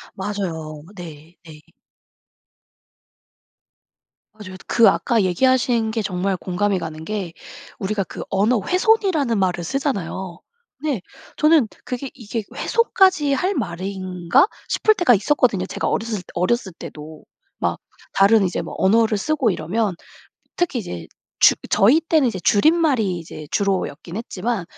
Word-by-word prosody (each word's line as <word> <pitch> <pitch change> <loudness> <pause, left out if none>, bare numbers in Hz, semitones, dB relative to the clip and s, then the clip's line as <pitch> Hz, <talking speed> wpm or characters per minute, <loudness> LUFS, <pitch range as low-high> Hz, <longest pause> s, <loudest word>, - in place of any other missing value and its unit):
맞아요. 165 -7 -4
네 165 -2 -11
네. 155 -2 -13 2.8
맞아요. 185 -3 -10
그 230 - +6
아까 230 -3 +1
얘기하신 235 +3 +2
게 225 - -1
정말 190 -1 -1
공감이 190 +2 -1
가는 160 -1 -7
게 195 -6 -4 0.5
우리가 200 0 -1
그 - - -7
언어 210 +4 +2
훼손이라는 365 - +2
말을 180 -2 0
쓰잖아요. 190 - -3 0.4
근데 285 -9 -2 0.4
저는 305 -6 +4 0.2
그게 255 +1 -4
'이게 230 -2 -4
훼손까지 375 -10 +2
할 370 +8 0
말인가?' 185 - 0 0.2
싶을 435 0 +3
때가 345 -9 +4
있었거든요. 205 -3 +2
제가 - - -3
어렸을 225 -1 -1
때 - - -11
어렸을 190 +2 0
때도. 155 -1 -10 0.4
막 - - -1 0.3
다른 200 +2 +5
이제 180 - -1
뭐 - - -8
언어를 215 +2 +3
쓰고 280 0 +1
이러면 185 +3 -1 0.6
특히 350 -7 0
이제 85 - -7 0.3
주 - - +7 0.2
저희 245 +11 +5
때는 315 -5 +2
이제 225 - -4
줄임말이 235 - +2
이제 155 -2 -10
주로였긴 185 -3 -2
했지만 225 -2 -3
205 Hz, 280 characters per minute, -21 LUFS, 180-250 Hz, 2.8 s, 주